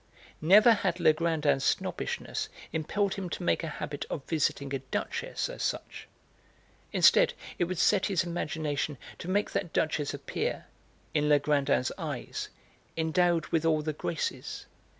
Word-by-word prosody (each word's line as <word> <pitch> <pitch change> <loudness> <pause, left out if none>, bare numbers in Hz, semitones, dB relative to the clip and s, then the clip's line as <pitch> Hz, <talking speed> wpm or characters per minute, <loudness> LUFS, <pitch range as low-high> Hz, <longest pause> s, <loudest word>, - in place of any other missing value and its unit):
Never 205 +9 +7
had 190 -4 -1
Legrandin's 155 -3 +2
snobbishness - - -1 0.2
impelled 195 +5 0
him 190 -3 -4
to 175 - -5
make 175 - +1
a - - -2
habit 150 -1 -4
of 140 - -4
visiting 140 -3 0
a 135 - 0
duchess 130 0 -3
as - - -7
such. - - -3 0.8
Instead, - - +5 0.2
it 175 - +3
would 185 +1 -4
set 190 +3 +3
his 190 -5 +1
imagination 155 -4 -2 0.2
to - - -7
make 205 +2 +1
that 170 - -2
duchess 150 -2 0
appear, - - -3 0.5
in 150 -1 +2
Legrandin's 140 -3 +3
eyes, - - -4 0.5
endowed 165 0 +2
with 165 -1 +1
all 155 -2 +2
the 155 0 -2
graces. 155 +1 -4
160 Hz, 140 wpm, -29 LUFS, 150-175 Hz, 0.8 s, Never